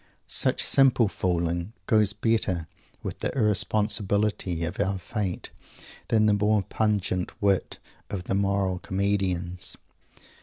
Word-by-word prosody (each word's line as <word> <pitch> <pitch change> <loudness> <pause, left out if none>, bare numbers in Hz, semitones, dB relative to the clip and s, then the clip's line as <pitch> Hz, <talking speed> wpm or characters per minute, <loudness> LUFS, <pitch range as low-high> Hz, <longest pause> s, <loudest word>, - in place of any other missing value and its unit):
Such - - +2
simple 130 -4 +5
fooling 85 0 -1
goes 105 -1 +3
better 105 -8 0 0.4
with - - -5
the - - -1
irresponsibility 105 -4 0
of 85 +3 -4
our 95 +1 0
fate 95 0 -4 0.6
than 110 -1 +3
the 105 - +4
more 105 0 +2
pungent 100 -3 -1
wit 100 -2 +1 0.3
of 95 -3 -4
the - - -2
moral 100 -2 +1
comedians. 95 -3 -1
100 Hz, 115 wpm, -26 LUFS, 90-105 Hz, 0.6 s, simple